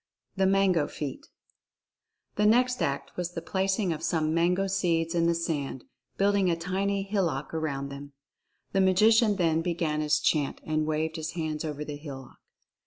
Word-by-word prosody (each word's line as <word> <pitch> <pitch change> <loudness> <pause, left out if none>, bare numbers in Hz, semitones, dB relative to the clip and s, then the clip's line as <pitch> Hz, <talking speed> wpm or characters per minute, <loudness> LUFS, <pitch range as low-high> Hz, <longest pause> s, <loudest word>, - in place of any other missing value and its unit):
THE 190 -1 +2
MANGO 190 -5 +3
FEAT. 145 -3 -6 1.1
The 210 0 +3
next 250 +3 +3
act 140 0 -2
was 175 -1 -3
the 165 - -4
placing 190 -1 0
of 155 - -7
some 160 -2 0
mango 180 +3 +2
seeds 170 -4 0
in 170 -1 +2
the 170 - +2
sand, 145 -6 -3 0.3
building 200 -1 +3
a 170 - +2
tiny 195 +4 -1
hillock 180 -9 -1
around 140 -4 -2
them. 140 +1 -9 0.6
The 195 - +2
Magician 210 +3 +4
then 165 -4 +2
began 165 -3 -1
his 150 0 +2
chant 145 -3 0
and 155 0 -1
waved 160 +1 -1
his 160 +1 -4
hands 155 -2 -3
over 150 -1 -4
the 150 -1 -6
hillock. 135 -4 -10
165 Hz, 165 wpm, -28 LUFS, 155-190 Hz, 1.1 s, Magician